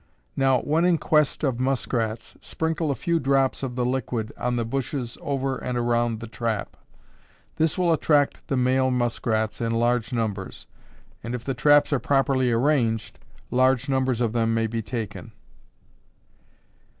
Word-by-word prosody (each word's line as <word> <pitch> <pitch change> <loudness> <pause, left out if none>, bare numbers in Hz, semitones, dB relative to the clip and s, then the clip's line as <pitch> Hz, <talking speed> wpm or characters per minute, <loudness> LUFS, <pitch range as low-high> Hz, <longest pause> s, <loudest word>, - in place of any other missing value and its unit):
Now, 135 -2 +3
when 155 +3 +1
in 175 -1 +4
quest 150 -1 +1
of 130 -4 0
muskrats, 120 -4 -2
sprinkle 160 -1 -2
a 140 - 0
few 170 +2 0
drops 135 -1 +1
of 130 -3 -4
the 125 -1 0
liquid 120 -3 -2
on 125 0 -1
the 120 -1 -1
bushes 125 0 -3
over 135 -1 -2
and 125 -1 -3
around 120 -1 0
the 115 - -6
trap. 110 -1 -3 0.8
This 160 -1 +1
will 175 -2 +3
attract 145 -2 +1
the 135 - 0
male 130 +1 +2
muskrats 115 -3 -1
in 115 0 0
large 120 +1 +1
numbers, 110 -5 -3 0.6
and 120 +3 -3
if 120 - -6
the 135 - -2
traps 145 +4 +4
are 140 - +2
properly 135 -1 +2
arranged, 115 -3 +1 0.3
large 130 +1 +3
numbers 130 -3 0
of 115 -2 0
them 115 -1 +1
may 115 0 +1
be 115 0 -2
taken. 110 0 -6
125 Hz, 155 wpm, -24 LUFS, 115-135 Hz, 0.8 s, in